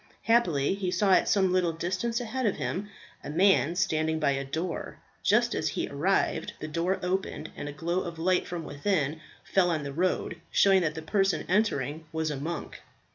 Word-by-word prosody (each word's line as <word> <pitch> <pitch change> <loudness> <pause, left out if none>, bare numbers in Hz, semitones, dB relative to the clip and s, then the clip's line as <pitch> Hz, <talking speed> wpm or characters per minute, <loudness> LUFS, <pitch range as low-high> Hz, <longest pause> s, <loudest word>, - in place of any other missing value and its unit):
Happily 180 -11 +3
he 195 -2 -2
saw 195 +2 +2
at - - +4
some 190 -3 +3
little 180 -3 +2
distance 185 +8 -2
ahead 245 +1 -2
of 200 - +1
him 205 +3 -3 0.3
a - - -6
man 175 0 +3
standing 160 -3 +1
by 145 -3 +2
a 135 0 -1
door. 160 +5 -4 0.2
Just - - +3
as - - -1
he - - -2
arrived 160 +8 0
the 155 - -5
door 170 +5 -1
opened, 190 +2 -2
and 145 - -5
a - - -5
glow 170 +4 -1
of 170 -2 -6
light 180 +3 +1
from 175 -2 -4
within 155 0 -1 0.2
fell 185 -2 +2
on 160 -3 -1
the 140 -1 -5
road, 180 +4 -1
showing 195 -1 +5
that 155 -3 -1
the 160 - -6
person 195 -1 +1
entering 160 -6 0
was 160 -1 -1
a - - -2
monk. 160 +4 -5
175 Hz, 190 wpm, -28 LUFS, 155-190 Hz, 0.3 s, showing